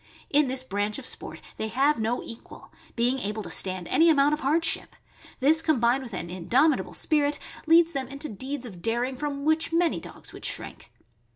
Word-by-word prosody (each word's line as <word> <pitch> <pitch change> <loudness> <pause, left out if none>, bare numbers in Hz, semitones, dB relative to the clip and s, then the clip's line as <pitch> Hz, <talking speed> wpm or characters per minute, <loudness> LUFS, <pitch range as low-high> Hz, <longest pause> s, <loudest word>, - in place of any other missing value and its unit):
In 295 0 +4
this 260 0 -1
branch 205 -3 -2
of - - -8
sport - - -3 0.2
they 220 - -2
have 270 +5 +2
no 225 +3 -1
equal, 230 - -10 0.2
being 245 +3 +1
able 210 -1 -3
to - - -7
stand 185 -2 0
any 325 +5 +4
amount 290 -1 +4
of 300 - -1
hardship; 320 +4 0 0.4
this, 305 +4 +3
combined 265 -5 +2
with 235 -6 -7
an 175 - -4
indomitable 240 - +1
spirit, 295 -2 +1 0.3
leads 335 +1 +5
them 270 -3 -3
into 280 +2 -5
deeds 260 +4 -5
of 185 -7 -10
daring 240 +5 0
from 280 0 -4
which 315 +1 +2
many 335 0 +2
dogs - - -10
would - - -11
shrink. - - -3
265 Hz, 185 wpm, -26 LUFS, 230-300 Hz, 0.4 s, leads